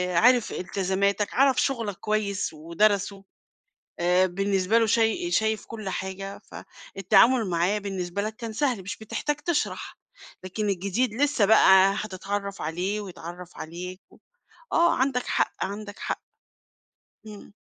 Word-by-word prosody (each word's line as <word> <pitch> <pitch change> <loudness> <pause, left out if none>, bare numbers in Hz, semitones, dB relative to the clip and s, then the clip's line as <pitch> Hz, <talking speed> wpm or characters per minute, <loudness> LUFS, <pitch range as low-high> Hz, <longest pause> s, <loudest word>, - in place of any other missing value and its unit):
آآ - - +5
عارف 245 +1 +4
إلتزاماتك، 195 +2 -1
عرَف 270 +1 +4
شُغلك 230 -7 -1
كويس 205 -4 -1
ودرَسه 195 +5 0 0.8
آآ، 180 +2 +3
بالنسبة 195 +3 +1
له 230 - +4
شاي 230 - +1
شايف 220 -5 +1
كلّ 215 -4 -6
حاجة، 190 +1 -5
فالتعامل 210 +4 +2
معاه 175 +4 +1
بالنسبة 195 -2 -3
لك 215 +1 -4
كان 230 -1 -6
سهل، 250 -4 0
مش 205 +5 -6
بتحتاج 220 +7 -3
تشرَح، 295 +1 -2 0.5
لكن 205 +3 -3
الجديد 200 +5 0
لسه 280 -3 +2
بقى 195 -2 +6
هتتعرّف 200 0 -4
عليه 180 +7 -2
ويتعرّف 180 -2 -9
عليك 180 +3 -7
و - - -19 0.6
آه، 340 +1 +4
عَندك 260 -1 0
حق، - - +1
عَندك 205 +1 -7
حق. - - -3 1.1
إمم. 205 -1 -11
200 Hz, 130 wpm, -26 LUFS, 190-225 Hz, 1.1 s, بقى